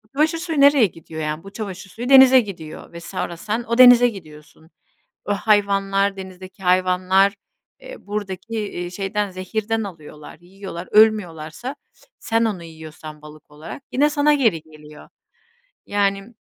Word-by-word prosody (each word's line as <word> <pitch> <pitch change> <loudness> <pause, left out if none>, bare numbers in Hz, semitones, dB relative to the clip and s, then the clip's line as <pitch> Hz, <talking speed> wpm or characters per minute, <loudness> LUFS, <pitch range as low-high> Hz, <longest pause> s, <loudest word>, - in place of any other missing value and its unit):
çamaşır 310 +3 +1
suyu 325 -4 -2
nereye 280 -4 +6
gidiyor, 160 -3 -8
yani 155 +1 -4
bu 195 +1 -12
çamaşır 195 -3 -7
suyu 240 +6 -6
denize 265 -1 +8
gidiyor 170 -7 -10
ve 170 - -8
sonra 170 0 -5
sen 220 +7 -3
o 235 +1 -1
denize 245 -1 +8
gidiyorsun. 160 -5 -14 0.6
O 205 - -1
hayvanlar, 200 -1 +1
denizdeki 190 0 -11
hayvanlar, 185 +2 +2 0.5
eee, - - -10
buradaki, 205 +1 -5
eee, 175 -4 -5
şeyden, 195 +2 -3
zehirden 220 +4 -3
alıyorlar, 155 -6 -11
yiyorlar, 185 0 -9
ölmüyorlarsa 210 - +1 0.4
sen 225 0 0
onu 200 -6 -3
yiyorsan 155 -1 -11
balık 150 -1 -15
olarak 150 - -10
yine 290 +3 +2
sana 295 0 +3
geri 225 - +1
geliyor. 150 -1 -15 0.8
Yani 200 +2 -1
195 Hz, 140 wpm, -21 LUFS, 170-225 Hz, 0.8 s, denize